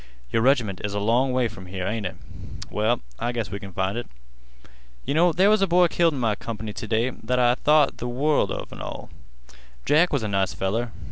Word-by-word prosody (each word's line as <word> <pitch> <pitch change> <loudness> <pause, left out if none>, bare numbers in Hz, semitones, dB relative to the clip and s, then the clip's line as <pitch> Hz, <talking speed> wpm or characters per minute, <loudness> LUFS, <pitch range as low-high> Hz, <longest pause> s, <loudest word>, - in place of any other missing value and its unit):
Your 115 - +2
reg'ment 120 -7 +2
is 100 0 -3
a - - 0
long 120 +6 +2
way 125 -1 +1
from 95 -4 -11
here, 90 0 -4
ain't 105 0 -2
it? - - -8 0.6
Well, 110 +3 +1 0.2
I 120 +1 -1
guess 115 -6 -4
we 100 - -4
can 100 -1 -9
find 95 +5 -1
it. 120 - -7 1.0
Yeh 140 - -1
know 170 +3 +4
there 190 +5 +4
was 215 -1 +3
a 195 - +3
boy 175 0 +4
killed 165 -3 +2
in - - -4
my 115 -3 +1
comp'ny 110 0 -6
t' 110 - -6
day 115 +3 +1
that 125 +1 -3
I 120 -1 +4
thought 150 +3 +3
th' 120 - -3
world 140 +5 +1 0.2
an' - - -9
all - - -7 0.4
of. 65 - -19 0.3
Jack 165 +4 +4
was 140 -6 0
a - - -1
nice 100 -2 0
feller. 110 +5 -2
120 Hz, 225 wpm, -24 LUFS, 105-140 Hz, 1.0 s, know